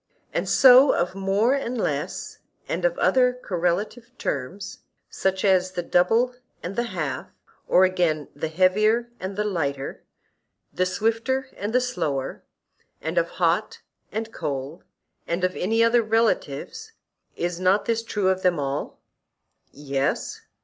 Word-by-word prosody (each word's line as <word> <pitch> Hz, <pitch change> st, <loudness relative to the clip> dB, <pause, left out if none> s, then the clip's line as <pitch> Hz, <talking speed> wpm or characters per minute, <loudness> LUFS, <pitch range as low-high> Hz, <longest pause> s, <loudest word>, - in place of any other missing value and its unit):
And -, -, -1 dB
so 260 Hz, +1 st, +7 dB
of 175 Hz, +1 st, 0 dB
more 195 Hz, +6 st, +1 dB
and 255 Hz, -3 st, -2 dB
less, -, -, -3 dB, 0.3 s
and -, -, -2 dB
of -, -, +1 dB
other 250 Hz, -1 st, +3 dB
correlative 200 Hz, +2 st, -2 dB
terms, 160 Hz, +9 st, -4 dB, 0.3 s
such 190 Hz, +1 st, -1 dB
as 185 Hz, -1 st, +3 dB
the 175 Hz, -1 st, -2 dB
double 225 Hz, +10 st, +2 dB, 0.3 s
and 185 Hz, +3 st, -5 dB
the 235 Hz, -, 0 dB
half, 140 Hz, -6 st, -3 dB, 0.4 s
or 185 Hz, -, +5 dB
again, 175 Hz, -5 st, +1 dB
the 160 Hz, -, -3 dB
heavier 210 Hz, +8 st, +2 dB
and 190 Hz, +1 st, -5 dB
the 210 Hz, -, 0 dB
lighter, 140 Hz, -9 st, -3 dB, 0.7 s
the 185 Hz, -, +1 dB
swifter 225 Hz, +7 st, -1 dB
and 205 Hz, +2 st, -4 dB
the 250 Hz, -, +4 dB
slower; 165 Hz, -, -2 dB, 0.6 s
and -, -, 0 dB
of -, -, -1 dB
hot -, -, +1 dB, 0.3 s
and 220 Hz, +1 st, -4 dB
cold, 140 Hz, +4 st, -4 dB, 0.4 s
and 170 Hz, +2 st, -2 dB
of 185 Hz, 0 st, +1 dB
any 225 Hz, +5 st, +2 dB
other 230 Hz, +1 st, +4 dB
relatives;—is 220 Hz, -, -2 dB
not 185 Hz, +3 st, +3 dB
this 230 Hz, -1 st, 0 dB
true 210 Hz, -4 st, 0 dB
of 190 Hz, 0 st, 0 dB
all 145 Hz, -6 st, +1 dB
of -, -, -8 dB
them? -, -, -29 dB, 0.7 s
Yes. 140 Hz, -1 st, -2 dB
190 Hz, 140 wpm, -24 LUFS, 175-230 Hz, 0.7 s, so